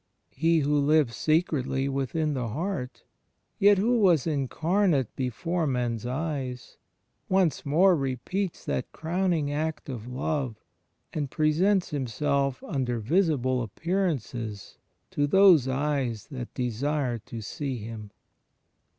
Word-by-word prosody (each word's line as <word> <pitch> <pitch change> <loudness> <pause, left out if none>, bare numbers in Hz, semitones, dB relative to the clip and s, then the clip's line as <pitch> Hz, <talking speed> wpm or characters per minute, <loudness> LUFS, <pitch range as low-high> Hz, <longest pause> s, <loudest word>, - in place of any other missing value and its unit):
He 165 0 +2
Who 145 +1 +2
lives 145 -4 +3
secretly 140 -5 +1
within 140 +3 -1
the 125 -4 -2
heart, 145 - -4 0.6
yet 200 0 +6
Who 235 +5 +2
was 175 - +4
Incarnate 155 - +1
before 160 +7 -1
men's 120 -3 -1
eyes, 130 -3 -4 0.5
once 185 -7 +1
more 180 +6 +5
repeats 145 +7 -3
that 125 - -2
crowning 165 -3 0
act 155 0 -3
of 120 -3 -6
love 130 -1 -2 0.6
and 145 -3 -2
presents 175 +6 +2
Himself 140 0 -1
under 125 -4 -2
visible 130 - +1
appearances 120 - -3 0.3
to 145 0 +1
those 180 -5 +6
eyes 130 -5 -1
that 125 -3 -6
desire 125 +1 -1
to 115 +2 -8
see 130 +4 -4
Him. 110 -1 -7
145 Hz, 115 wpm, -27 LUFS, 125-165 Hz, 0.6 s, yet